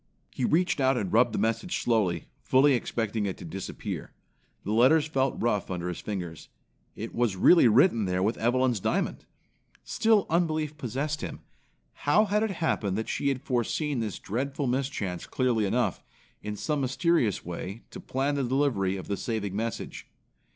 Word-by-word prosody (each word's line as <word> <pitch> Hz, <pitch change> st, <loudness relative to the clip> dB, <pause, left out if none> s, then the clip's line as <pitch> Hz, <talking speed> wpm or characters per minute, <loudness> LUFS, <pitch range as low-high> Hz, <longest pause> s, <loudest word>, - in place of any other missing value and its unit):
He 130 Hz, -, -2 dB
reached 180 Hz, +3 st, +2 dB
out 130 Hz, 0 st, +3 dB
and 100 Hz, -5 st, -2 dB
rubbed 120 Hz, +1 st, +5 dB
the -, -, -3 dB
message 115 Hz, +9 st, 0 dB
slowly, 110 Hz, -7 st, +1 dB, 0.2 s
fully 135 Hz, +2 st, +4 dB
expecting 110 Hz, -3 st, -1 dB
it 95 Hz, -, -4 dB
to -, -, -9 dB
disappear. 90 Hz, +4 st, -6 dB, 0.5 s
The 100 Hz, -, -3 dB
letters 130 Hz, +8 st, +5 dB
felt 135 Hz, -4 st, 0 dB
rough 105 Hz, -4 st, 0 dB
under 90 Hz, -1 st, -3 dB
his 90 Hz, -, -5 dB
fingers. 90 Hz, -7 st, -6 dB, 0.5 s
It 115 Hz, +2 st, -6 dB
was 115 Hz, -5 st, +1 dB
really 165 Hz, -, +6 dB
written 115 Hz, -, +4 dB
there 90 Hz, 0 st, 0 dB
with 110 Hz, +3 st, 0 dB
Evelyn's 125 Hz, 0 st, +2 dB
diamond. -, -, -1 dB, 0.6 s
Still 220 Hz, -3 st, +2 dB
unbelief 155 Hz, -3 st, 0 dB
possessed 145 Hz, +3 st, -3 dB
him. -, -, -6 dB, 0.5 s
How 210 Hz, +10 st, +3 dB
had 210 Hz, +1 st, +1 dB
it 220 Hz, -, +1 dB
happened 155 Hz, -, -1 dB
that 110 Hz, -, -3 dB
she -, -, -1 dB
had 135 Hz, -1 st, 0 dB
foreseen 135 Hz, +2 st, -1 dB
this 110 Hz, -4 st, -3 dB
dreadful 135 Hz, +6 st, -3 dB
mischance 125 Hz, -9 st, -2 dB
clearly 120 Hz, -5 st, +1 dB
enough, 95 Hz, -, 0 dB, 0.4 s
in 105 Hz, 0 st, -4 dB
some 150 Hz, +7 st, -1 dB
mysterious 130 Hz, -, +1 dB
way, 90 Hz, +5 st, -6 dB
to -, -, -8 dB
plan 135 Hz, +2 st, -1 dB
the 140 Hz, -1 st, 0 dB
delivery 120 Hz, -8 st, +1 dB
of 95 Hz, -, -8 dB
the 100 Hz, -, -1 dB
saving 105 Hz, -4 st, -3 dB
message? 115 Hz, +2 st, -4 dB
120 Hz, 165 wpm, -28 LUFS, 105-145 Hz, 0.6 s, really